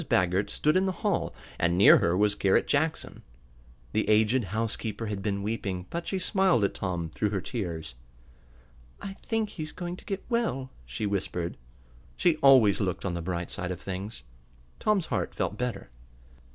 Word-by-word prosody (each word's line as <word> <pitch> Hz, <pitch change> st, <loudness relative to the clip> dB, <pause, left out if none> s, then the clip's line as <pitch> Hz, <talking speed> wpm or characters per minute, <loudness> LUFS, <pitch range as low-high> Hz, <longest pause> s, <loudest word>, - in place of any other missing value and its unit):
Baggert 90 Hz, +2 st, +2 dB
stood 150 Hz, +2 st, +1 dB
in 190 Hz, +1 st, +3 dB
the -, -, +1 dB
hall, 200 Hz, -4 st, +1 dB, 0.3 s
and 85 Hz, +1 st, +2 dB
near 100 Hz, -, +9 dB
her 85 Hz, +1 st, +2 dB
was 105 Hz, 0 st, +3 dB
Garret 100 Hz, -1 st, +2 dB
Jackson. 155 Hz, +2 st, 0 dB, 0.7 s
The 110 Hz, 0 st, +1 dB
aged 110 Hz, +3 st, +4 dB
housekeeper 110 Hz, +2 st, -3 dB
had 105 Hz, -2 st, -3 dB
been 100 Hz, 0 st, -1 dB
weeping, 100 Hz, -4 st, -3 dB
but 170 Hz, 0 st, -4 dB
she 195 Hz, -, -1 dB
smiled 190 Hz, -, +3 dB
at 100 Hz, -, +1 dB
Tom 85 Hz, -4 st, -3 dB
through 105 Hz, -, 0 dB
her 100 Hz, -1 st, -1 dB
tears. 85 Hz, -, -4 dB, 1.1 s
"I 195 Hz, -1 st, -6 dB
think 220 Hz, +1 st, -2 dB
he's 155 Hz, -3 st, -6 dB
going 175 Hz, 0 st, -5 dB
to -, -, -16 dB
get 195 Hz, -1 st, -4 dB
well," 230 Hz, -, -1 dB, 0.2 s
she 65 Hz, -, -3 dB
whispered. 90 Hz, -4 st, -2 dB, 0.6 s
She 170 Hz, -3 st, +3 dB
always 130 Hz, -8 st, +6 dB
looked 95 Hz, -2 st, -2 dB
on 90 Hz, -, -1 dB
the 85 Hz, -, -3 dB
bright 85 Hz, 0 st, -3 dB
side 90 Hz, -, -3 dB
of 90 Hz, -2 st, -4 dB
things. 95 Hz, -, -5 dB, 0.6 s
Tom's 205 Hz, -5 st, +2 dB
heart -, -, -2 dB
felt -, -, -1 dB
better. 120 Hz, -, -4 dB
105 Hz, 170 wpm, -28 LUFS, 95-155 Hz, 1.1 s, near